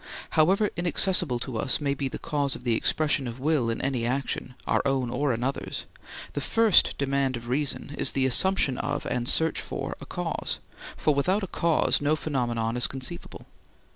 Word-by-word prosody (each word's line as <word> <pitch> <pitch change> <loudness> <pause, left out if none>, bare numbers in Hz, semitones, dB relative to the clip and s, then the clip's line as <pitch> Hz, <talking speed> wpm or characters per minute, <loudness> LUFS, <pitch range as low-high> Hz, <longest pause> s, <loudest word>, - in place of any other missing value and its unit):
However 190 +7 +3
inaccessible 175 -5 +3
to 125 -4 -4
us 130 - +2
may 140 -2 0
be 140 0 -3
the - - -5
cause 145 -3 -1
of - - -10
the 120 -2 +1
expression 145 0 +1
of 120 +2 -7
will 140 -4 +1
in 115 - -2
any 130 -3 -1
action, 125 0 -2
our - - +2
own 135 -3 0
or 140 +2 0
another's, 125 +4 -3 0.5
the 145 - -3
first 225 +6 +4
demand 140 -2 0
of 120 0 -10
reason 140 +2 -2
is - - +1
the 135 -1 +1
assumption 135 0 +3
of 145 0 -3
and 120 0 -1
search 160 0 +1
for - - -5
a - - -9
cause, - - -3 0.4
for 150 - +2
without 185 +9 +1
a - - 0
cause 170 -5 +1
no 145 +2 +2
phenomenon 120 -7 -2
is 125 - +3
conceivable. 130 -10 -6
140 Hz, 180 wpm, -26 LUFS, 125-155 Hz, 0.5 s, first